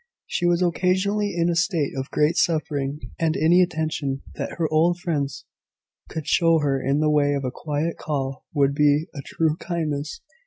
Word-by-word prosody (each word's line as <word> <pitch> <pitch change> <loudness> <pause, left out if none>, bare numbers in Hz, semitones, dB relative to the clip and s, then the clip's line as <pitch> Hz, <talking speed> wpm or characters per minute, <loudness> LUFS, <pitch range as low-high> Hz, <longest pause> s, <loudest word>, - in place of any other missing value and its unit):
She 175 - -1
was 175 +1 +2
occasionally 190 +3 +1
in 170 0 +2
a 170 - +1
state 170 -3 0
of 135 +1 -4
great 150 +2 +2
suffering, 150 -3 -1
and 160 -1 +1
any 170 +4 +5
attention 155 -5 -1
that - - -5
her 165 -2 0
old 170 +3 +3
friends 145 -7 -3 0.6
could 160 -2 -5
show 165 +1 +3
her 140 -3 0
in 140 +3 +1
the 155 0 +3
way 145 -1 +3
of 140 -1 -3
a 125 - -2
quiet 155 +4 -3
call 135 -3 -3
would 140 -2 +2
be 150 +1 +3
a 140 - -6
true 160 +2 0
kindness. 155 -5 -3
155 Hz, 180 wpm, -23 LUFS, 145-170 Hz, 0.6 s, any